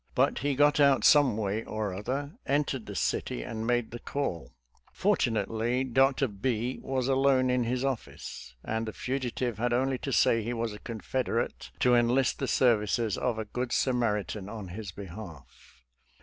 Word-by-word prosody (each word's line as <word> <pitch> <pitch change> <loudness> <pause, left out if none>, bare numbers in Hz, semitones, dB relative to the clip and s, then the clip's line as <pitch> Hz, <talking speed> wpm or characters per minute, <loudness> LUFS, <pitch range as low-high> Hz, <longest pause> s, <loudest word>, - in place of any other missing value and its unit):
But - - +2
he 140 +1 0
got 145 +2 +4
out 140 -2 +5
some 145 -7 +5
way 105 +1 -1
or 110 -3 -3
other, 135 +9 -3 0.2
entered 140 -4 0
the 100 - -6
city, - - -1
and 110 0 -4
made 120 -2 +1
the 120 - -6
call. 115 - -3 0.4
Fortu 120 - +1
nately, 115 +4 0
Dr. 135 +1 +3
B 115 +3 -2
was 130 -1 -1
alone 135 -1 +3
in 125 -1 +1
his 125 +3 -1
office, 115 - -5
and 110 +1 -2
the 110 - -4
fugitiverhad 120 -2 -2
only 130 +1 +1
to 135 - -4
say 115 -2 +4
he 115 +3 -3
was 115 -2 -2
a 105 - -9
Confeder 115 +1 -1
ate,! - - -12
to 125 - +5
enlist 120 +2 +3
the 135 - -1
services 115 -3 +2
of 120 -3 -1
a 110 - -3
good 125 +3 -4
Samaritan 105 -6 0
in 105 -4 -7
his 100 +1 -6
behalf. 80 - -11
120 Hz, 170 wpm, -29 LUFS, 105-130 Hz, 0.4 s, out